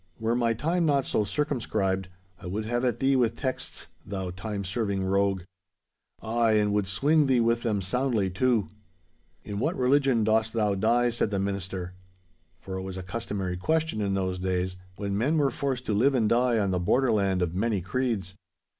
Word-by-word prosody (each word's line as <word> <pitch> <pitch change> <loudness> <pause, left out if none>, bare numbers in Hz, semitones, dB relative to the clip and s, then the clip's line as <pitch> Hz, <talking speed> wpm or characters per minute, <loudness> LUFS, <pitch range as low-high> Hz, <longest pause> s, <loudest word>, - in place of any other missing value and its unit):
Were 115 +1 0
my 115 -2 +1
time 165 +8 0
not 140 -2 +2
so 105 - +1
circumscribed, 105 -7 -1 0.3
I 95 - -8
would 105 +4 -3
have 120 +2 -1
at 125 -2 0
thee 135 0 +3
with 120 -3 +2
texts, 130 -2 -4 0.2
thou 95 -2 -4
time 100 +2 -5
serving 100 0 -1
rogue. 100 -1 +1 0.8
Ay, 115 0 +2
and 105 -1 +2
would 105 -1 +1
swinge 145 +9 +3
thee 130 -2 +3
with 115 0 +2
them 105 -5 -1
soundly, 120 0 +1
too.' 115 +2 +1 0.7
'In 100 -1 -5
what 155 +9 0
religion 130 -2 +3
dost 110 +1 +2
thou 105 -3 +1
die?' 120 +5 +2
said 115 -2 0
the 100 - -1
minister. 95 -2 -3 0.7
For 95 -1 -6
it - - -3
was 95 0 -6
a 95 - -5
customary 95 -2 -3
question 160 - 0
in 100 -1 0
those 95 -1 -1
days, 90 0 -1 0.2
when 100 0 -3
men 135 +10 +1
were 140 -3 +2
forced 130 -3 -2
to 110 - 0
live 130 +7 +3
and 115 -4 +2
die 120 +1 +3
on 100 -3 +1
the 90 - 0
borderland 100 -2 +2
of 85 -1 -2
many 105 +2 0
creeds. 100 -1 -2
110 Hz, 185 wpm, -27 LUFS, 95-125 Hz, 0.8 s, thee